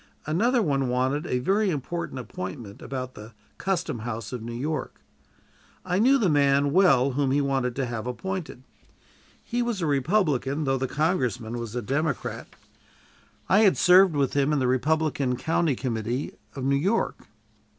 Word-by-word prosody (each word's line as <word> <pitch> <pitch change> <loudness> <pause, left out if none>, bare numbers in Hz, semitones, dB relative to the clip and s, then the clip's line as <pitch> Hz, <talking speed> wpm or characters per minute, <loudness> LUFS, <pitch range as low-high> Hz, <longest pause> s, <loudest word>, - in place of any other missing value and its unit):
Another 230 - +2
one 135 -6 0
wanted 130 +5 0
a 125 - 0
very 195 +11 +1
important 170 0 -4
appointment 100 -3 -7
about 130 -1 -5
the 105 +2 -11 0.3
custom 180 -10 -1
house 115 0 -5
of 125 - -4
New 115 +1 -6
York. 150 +6 -4 0.9
I 180 0 0
knew 260 +5 +5
the 225 -7 +2
man 140 -2 +3
well 140 -7 +4
whom 135 +1 0
he 140 +2 +2
wanted 135 -3 0
to 135 - -1
have 120 -1 -4
appointed. 165 +1 -5 0.8
He 240 0 -2
was 235 -4 -1
a 170 - -1
Republican, 145 - +1
though 135 -2 0
the 130 - -1
congressman 125 -6 -1
was 115 -1 -6
a 125 - -2
Democrat. 145 +7 -2 1.0
I 195 - +4
had 210 -4 +5
served 180 -2 +6
with 140 -2 +1
him 140 +1 +2
in 150 - +2
the 130 - +1
Republican 140 0 +1
county 160 -1 +1
committee 120 +1 -3 0.2
of 135 - -5
New 140 +1 +2
York. 195 +10 -1
140 Hz, 160 wpm, -26 LUFS, 125-170 Hz, 1.0 s, served